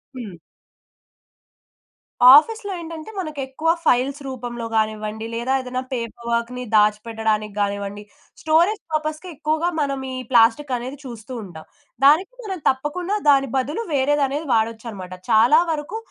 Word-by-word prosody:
హ్మ్. 230 -7 -7 2.0
ఆఫీస్‌లో 410 +6 +3
ఏంటంటే, 330 +2 -8
మనకి 310 -5 -5
ఎక్కువ 310 +5 -2 0.2
ఫైల్స్ 265 +3 +2
రూపంలో 240 -2 -5
గానివ్వండి, 215 0 -1
లేదా 235 +3 -1
ఏదన్నా 255 0 -4
పేపర్ 235 -1 -5
వర్క్‌ని 235 +2 -2
దాచిపెట్టడానికి 215 0 +1
గానివ్వండి, 200 0 -2 0.4
స్టోరేజ్ 340 +7 +2
పర్పస్‌కి 310 +2 -2
ఎక్కువగా 310 +3 0
మనం 275 -2 -1
ఈ - - -5 0.2
ప్లాస్టిక్ 245 +4 +4
అనేది 255 +4 -7
చూస్తూ 235 -1 -9
ఉంటాం. 160 -5 -11 0.4
దానికి 325 - +5
మనం 380 -4 -5
తప్పకుండా 300 +9 -2
దాని 275 -1 +4
బదులు 290 - -2
వేరేదనేది 285 +2 +1
వాడొచ్చనమాట. 220 -4 -2 0.2
చాలా 235 +8 +6
వరకు 305 +7 -4
260 Hz, 120 wpm, -22 LUFS, 225-305 Hz, 2.0 s, చాలా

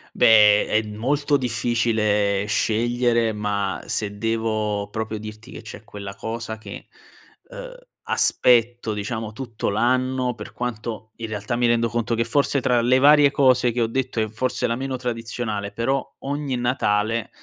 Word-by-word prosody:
Beh, 105 -2 +6
è 110 - +2
molto 140 +7 0
difficile 110 -5 0
scegliere 115 +2 +1
ma, 105 -2 -2
se 105 -1 -3
devo 110 -2 -1
proprio 110 0 -4
dirti 110 +3 -10
che - - -9
c'è 110 -1 -10
quella 100 -2 -8
cosa 110 +1 -5
che, 105 -2 -10 0.6
ehm, - - -9 0.3
aspetto, 120 -2 +2
diciamo, 110 +1 -4
tutto 115 -2 -4
l'anno, 125 +3 +1
per 105 -2 -10
quanto 115 -2 -5
in 115 - -5
realtà 110 +2 -3
mi 120 0 +2
rendo 115 0 +2
conto 115 +1 -1
che 115 - +1
forse 140 +4 +1
tra 125 -2 +2
le 125 +2 +3
varie 145 +1 +6
cose 130 -3 +3
che 120 +1 -2
ho 115 - +2
detto 130 0 -2
è 110 - +1
forse 125 +3 -2
la 115 -1 0
meno 135 +1 -3
tradizionale, 115 -4 -4
però 130 +6 -2
ogni 140 -1 -3
Natale, 115 -3 0
115 Hz, 150 wpm, -23 LUFS, 110-125 Hz, 0.6 s, Beh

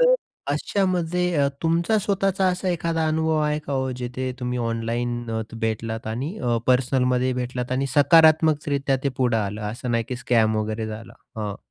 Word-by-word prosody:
तर - - +6 0.4
अशामध्ये 180 -2 0
अ, 140 -1 +3
तुमचा 170 +6 +2
स्वतःचा 195 -1 +1
असा 185 +1 -1
एखादा 165 -2 0
अनुभव 160 0 +1
आहे 150 0 +1
का 140 - -3
हो, 130 -1 0
जिथे 125 +1 -3
तुम्ही 125 0 -2
ऑनलाईन 120 +1 -2
अ, 110 0 -1 0.2
भेटलात 110 0 -2
आणि 135 - -4
अ, 120 -2 0
पर्सनलमध्ये 125 0 +2
भेटलात 125 0 -3
आणि 135 +2 0
सकारात्मकरित्या 150 -2 +4
ते - - +3
पुढे 125 -3 +2
आलं 105 0 -3
असं 120 +3 -5
नाही 115 -1 +1
की 125 - -3
स्कॅम 115 -3 +2
वगैरे 110 +1 -2
झाला? 110 +1 -8 0.3
हां. 105 -2 -3
130 Hz, 165 wpm, -23 LUFS, 120-160 Hz, 0.4 s, तर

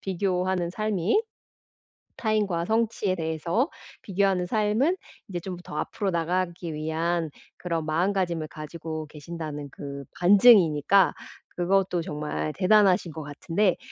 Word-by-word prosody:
비교하는 185 -2 -1
삶이. 215 - +1 1.0
타인과 205 -7 0
성취에 220 -3 0
대해서 170 - -1 0.3
비교하는 195 -2 +1
삶은 220 - +1 0.3
이제 175 -2 -3
좀 180 0 -6
더 150 - -7
앞으로 200 +4 -2
나가기 170 0 -1
위한 160 +2 -1 0.3
그런 165 -3 -2
마음가짐을 170 -1 0
가지고 155 0 -6
계신다는 150 -1 -7
그 140 0 -7 0.2
반증이니까 190 - +6 0.4
그것도 180 0 +1
정말 150 0 -3
대단하신 190 -2 +4
것 160 - -6
같은데 165 +6 0
175 Hz, 285 characters per minute, -26 LUFS, 160-195 Hz, 1.0 s, 반증이니까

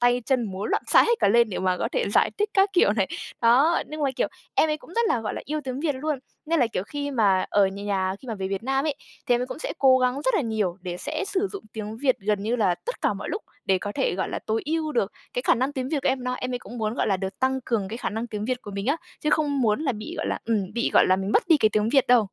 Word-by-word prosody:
tay 245 0 +3
chân 260 -3 +2
múa 195 -1 -5
loạn - - 0
xạ - - +7
hết 475 - +3
cả - - +4
lên 235 +1 +4
để 185 - -3
mà 185 -1 +1
có - - -1
thể - - +1
giải - - +4
thích 420 0 +1
các 390 0 +4
kiểu 350 - +4
này. 200 -3 0 0.3
Đó, 265 +9 +5
nhưng 305 0 -5
mà, 275 - +2
kiểu, - - +1 0.3
em 315 - +4
ấy 305 - 0
cũng 315 - -16
rất 470 - +3
là, 235 - +1
gọi 215 - -3
là, - - -4
yêu 305 +1 -2
tiếng 260 +1 -4
Việt 300 -2 0
luôn. 290 +1 -2 0.3
Nên 330 -2 +2
là 245 - +4
kiểu 205 -5 -3
khi 285 +6 -4
mà 200 -7 +3
ở 200 -1 +4
nh 190 - -8
nhà 190 -2 0
khi 255 - -12
mà 225 - -2
về 190 -1 -4
Việt 195 +2 -3
Nam 270 +3 0
ấy, 300 - 0 0.3
thì 245 - +4
em 250 +1 0
cũng - - -7
sẽ - - -3
cố 260 -1 +6
gắng 250 0 +2
rất 260 - +1
là - - +3
nhiều 215 -6 -1
để 180 -1 -5
sẽ 310 - -3
sử 395 0 0
dụng 400 - -7
tiếng 215 0 -5
Việt 260 0 +2
gần 205 0 -1
như 230 +3 0
là 195 -6 +2
tất - - -7
cả - - +2
mọi - - -6
lúc 420 - -3 0.2
để 190 -1 +2
có 205 +2 -5
thể, - - 0
gọi 190 - -2
là, - - -3
tối 220 +1 0
ưu 310 0 -1
được 210 -4 0 0.2
cái 245 - -2
khả - - +4
năng 260 +4 -1
tiếng 260 -2 -3
Việt 300 - 0
của - - +2
em 260 -1 0
nó. 250 - -1
Em 255 0 -4
ấy 245 - -1
cũng 240 +1 -10
muốn, 215 0 -1
gọi - - 0
là, 195 - +2
được 190 0 -5
tăng 265 0 +1
cường 210 -5 -1
cái 225 - -5
khả - - -3
năng 225 +3 -3
tiếng 210 -2 -4
Việt 250 +2 -2
của 205 - -8
mình 200 +2 -4
á, 285 +4 +2 0.2
chứ 300 - 0
không 290 -3 +1
muốn 220 +2 +2
là 270 -5 +1
bị, 215 0 -7
gọi - - -2
là, - - -1
ừm, 210 -4 -1
bị, 235 - 0
gọi - - +6
là, 185 - +4
mình 195 +2 -2
mất - - +4
đi 325 - +7
cái 215 -6 +4
tiếng 215 0 +2
Việt 270 +2 +3
đâu. 240 -5 +4
240 Hz, 320 wpm, -25 LUFS, 205-285 Hz, 0.3 s, xạ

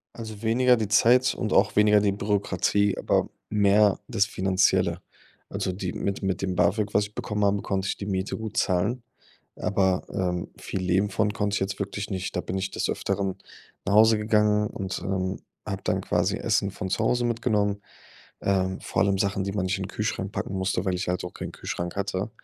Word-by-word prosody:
Also 110 -2 -8
weniger 125 +2 +4
die 110 -3 -2
Zeit 125 +5 +4
und 110 - -3
auch 100 0 +3
weniger 105 0 +6
die 100 -1 +2
Bürokratie, 100 0 +1
aber - - +1 0.2
mehr 105 -1 +4
das 100 - +2
Finanzielle. 95 -2 +1 0.5
Also 95 - -2
die 90 -1 -4
mit 100 0 -3
mit 95 -1 -1
dem 95 -1 -1
BAföG, 105 0 +2
was 105 - +4
ich 105 +1 -11
bekommen 105 0 -2
habe, 100 0 +2
konnte 95 0 -1
ich - - -1
die 100 - -6
Miete 95 -1 -2
gut 110 0 -6
zahlen, 105 +7 +1 0.5
aber, 95 -2 +1
ähm, 90 -2 -2
viel 95 - -4
Leben 95 +2 +2
von 105 -1 +1
konnte 105 -1 -1
ich - - 0
jetzt 95 +1 -2
wirklich 100 +1 -4
nicht. 95 -1 -3
Da - - +1
bin 95 - -3
ich 95 0 -2
des - - -2
Öfteren 95 -1 -2 0.5
nach 100 - +1
Hause 110 0 +6
gegangen 105 -1 +2
und, 95 -1 -4
ähm, 95 0 -2 0.3
habe - - -4
dann - - +1
quasi - - 0
Essen 100 - +1
von 95 0 -5
zu 110 - 0
Hause 120 +2 +2
mitgenommen. 105 -4 0 0.6
Ähm, 95 -1 0
vor - - 0
allem 100 -1 +2
Sachen, 100 -1 0
die 100 - -3
man 95 -2 -1
nicht 95 +1 0
in - - -4
den - - -6
Kühlschrank 105 -2 -3
packen 100 - -3
musste, 95 -1 -1
weil 95 - 0
ich 90 +1 -3
halt 90 0 -1
auch 90 - -7
keinen - - -6
Kühlschrank 85 +1 -5
hatte. 100 +1 -2
100 Hz, 205 wpm, -26 LUFS, 95-105 Hz, 0.6 s, weniger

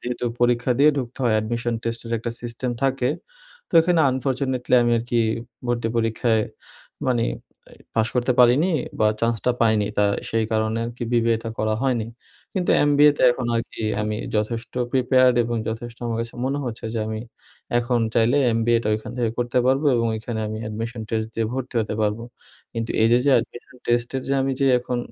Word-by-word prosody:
যেহেতু 125 0 -4 0.2
পরীক্ষা 120 +1 +2
দিয়ে 145 +2 +6
ঢুকতে 125 -1 -5
হয় 115 - +3
অ্যাডমিশন 115 +2 -1
টেস্টের 115 0 -4
একটা 115 +1 -4
সিস্টেম 120 +1 -4
থাকে 135 -2 +1 0.6
তো - - -29
এখানে 170 0 +2
আনফরচুনেটলি 130 -1 -1
আমি 120 0 +2
আর - - -3
কি 120 - +3 0.5
ভর্তি 120 -1 0
পরীক্ষায় 115 0 +1 0.7
মানে 120 -2 +2 0.7
পাশ 110 0 +2
করতে 125 +1 +2
পারিনি 130 +9 +5 0.3
বা 110 - +5
চান্সটা 115 +1 +1
পাইনি 110 -3 +3
তা 105 - +5 0.3
সেই 115 0 +1
কারণে 110 0 0
আরকি 120 0 -5
বিবিএটা 115 -1 +1
করা 110 0 +1
হয়নি। 120 -5 0 0.5
কিন্তু 185 -3 0
এমবিএতে 145 0 +4
এখন 125 -1 -4
আর 115 - +1
কি - - -7 0.2
আমি 105 0 -2 0.2
যথেষ্ট 115 +3 -2 0.2
প্রিপেয়ার্ড 130 0 +4
এবং 120 0 -2
যথেষ্ট 115 +1 -5
আমার 115 - -2
কাছে 115 0 -6
মনে 135 +2 -1
হচ্ছে 115 -3 -6
যে - - -1
আমি 110 0 -4 0.6
এখন 120 0 0
চাইলে 115 +5 +3
এমবিএটা 115 0 +1
ওইখান 110 +1 -5
থেকে 115 -2 +1
করতে 120 +1 0
পারবো 135 +3 +2
এবং 115 0 +1
ওইখানে 110 0 -4
আমি 110 0 -4
অ্যাডমিশন 110 +2 -5
টেস্ট 110 -1 -1
দিয়ে 115 -1 0
ভর্তি 130 -1 -5
হতে 110 - -3
পারব। 105 +1 0 0.5
কিন্তু 115 0 -3
এই 110 - +5
যে 120 - +6
যে 140 - +4
অ্যাডমিশন 120 +2 -5
টেস্টের 120 +2 0
যে - - 0
আমি 135 0 0
যে 135 - +3
এখন 125 0 -3
120 Hz, 175 wpm, -23 LUFS, 115-125 Hz, 0.7 s, দিয়ে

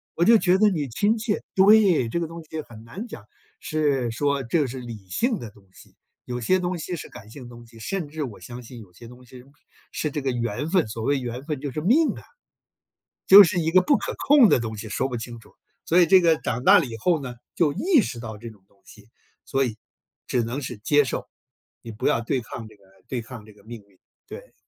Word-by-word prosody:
我 170 - +1
就 225 +2 +7
觉 185 -2 +3
得 215 +1 +4
你 155 -8 -2
亲 205 - +1
切。 215 -1 -2
对， 195 - +5
这 170 - -2
个 165 - -2
东 165 +1 -9
西 155 0 -6
很 115 -6 -14
难 195 - -8
讲。 110 - -11 0.4
是， 145 -6 0
说 140 +4 0
这 150 +7 0
个 140 - 0
是 130 +1 -7
理 110 -6 -10
性 230 - 0
的 115 - -8
东 100 -2 -22
西， - - -19 0.3
有 125 0 -4
些 185 +11 +2
东 180 0 -2
西 175 +3 -4
是 - - -9
感 105 +2 -13
性 135 -1 -11
的 120 - -11
东 120 -1 -13
西， 115 - -17
甚 175 - -4
至 155 0 -4
我 120 -6 -8
相 125 0 -10
信 120 0 -11
有 95 -5 -15
些 115 +6 -13
东 125 +1 -15
西 125 0 -14 0.5
是 150 - -2
这 145 - -3
个 135 -1 -1
缘 120 +4 -3
分， 180 - +2
所 110 +1 -6
谓 140 +1 +1
缘 125 +2 -6
分 150 -4 -3
就 145 -2 -4
是 155 - -4
命 275 - +3
啊， - - -10 1.0
就 200 +1 +11
是 175 0 0
一 160 0 0
个 185 +1 +6
不 285 +8 +3
可 - - -4
控 280 -4 +7
的 - - +4
东 110 -2 -5
西， 105 +2 -7
说 130 +6 -1
不 120 - -4
清 115 0 -8
楚。 110 - -20 0.3
所 170 - +3
以 175 - +6
这 190 -1 +6
个 165 -2 +3
长 120 +2 -3
大 200 +6 +7
了 165 - -1
以 115 -3 -7
后 160 +6 +1
呢， 125 -2 -6 0.2
就 150 -4 +2
意 335 - +3
识 120 - -5
到 110 -2 -7
这 115 +2 -9
种 100 -3 -22
东 100 - -32
西， 105 +1 -17 0.4
所 135 -1 0
以 110 - -4 0.5
只 120 -2 0
能 125 +5 -4
是 125 -4 -6
接 145 +7 +3
受， 130 - -4 0.5
你 115 - -9
不 105 - -7
要 115 - +2
对 125 +2 -2
抗 115 0 -9
这 110 - -17
个 100 - -27 0.2
对 125 -3 -3
抗 115 -2 -10
这 110 - -16
个 100 - -22
命 115 0 -10
运， 95 - -28 0.3
对。 - - -11
130 Hz, 270 characters per minute, -24 LUFS, 115-170 Hz, 1.0 s, 就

